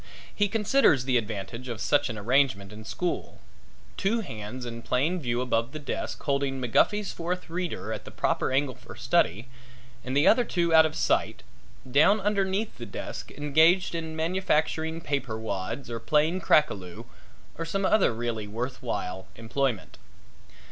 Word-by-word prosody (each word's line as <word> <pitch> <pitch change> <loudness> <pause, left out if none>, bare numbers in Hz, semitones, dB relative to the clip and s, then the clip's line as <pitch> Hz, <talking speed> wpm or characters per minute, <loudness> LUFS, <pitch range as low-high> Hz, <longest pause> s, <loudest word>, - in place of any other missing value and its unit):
He 205 - +2
considers 210 - +3
the 130 -1 +1
advantage 110 +2 -4
of 115 -3 -5
such 145 +4 +2
an 110 - -4
arrangement 105 -3 +1
in 110 +1 -10
school 175 +9 -3 0.6
two 225 +4 +1
hands 115 - -7
in 115 -1 -6
plain 150 +10 0
view 120 -4 -1
above 120 +1 0
the - - -4
desk 145 - -4
holding 140 -2 0
McGuffy's 195 - +2
Fourth 175 0 -4
Reader 180 0 -3
at - - -6
the - - -10
proper - - 0
angle 135 0 +1
for - - -13
study 105 +10 +1 0.6
and 130 +2 -2
the 145 - +4
other 245 - +6
two 170 -6 0
out 160 0 +8
of 155 - -9
sight, - - 0 0.5
down 155 +11 +5
underneath 200 - -1
the 120 - -6
desk 100 - -6
engaged 160 +6 +3
in 160 -1 -4
manufacturing 160 -1 0
paper 135 -7 -2
wads 110 +4 -4
or 115 -1 -4
playing 155 +9 +1
crack 150 -2 +4
a - - -1
loo 90 -3 -9 0.5
or - - -1
some 195 +4 -1
other 215 - +4
really 115 -2 -3
worth 125 +6 -4
while 95 -5 -4
employment. 115 0 -2
140 Hz, 160 wpm, -27 LUFS, 115-170 Hz, 0.6 s, out